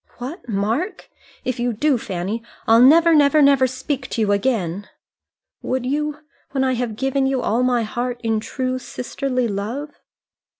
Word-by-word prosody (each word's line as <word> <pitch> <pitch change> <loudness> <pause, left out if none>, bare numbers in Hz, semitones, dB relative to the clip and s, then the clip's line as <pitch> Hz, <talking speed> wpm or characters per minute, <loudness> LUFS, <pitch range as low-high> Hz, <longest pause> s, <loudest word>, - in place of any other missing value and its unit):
"What, 255 +2 -7
Mark! 225 - -2 0.3
If 255 -1 -2
you 240 0 0
do, 270 +3 +1
Fanny, 195 +4 -3 0.3
I'll 225 +1 +6
never, 330 +6 +7
never, 295 0 +5
never 275 -2 +5
speak 260 +1 -4
to 230 - -2
you 205 -2 +2
again. 200 -3 -1 0.7
Would 255 -1 -2
you 300 +2 -2 0.3
when 265 -1 +1
I 260 -1 +1
have 240 -3 -2
given 270 +2 0
you 265 -2 0
all 230 +4 +1
my 250 -2 +2
heart 240 +2 -3
in 225 -1 +1
true 255 +3 -3
sisterly 255 0 -3
love?" 225 +9 -4
250 Hz, 160 wpm, -21 LUFS, 225-275 Hz, 0.7 s, never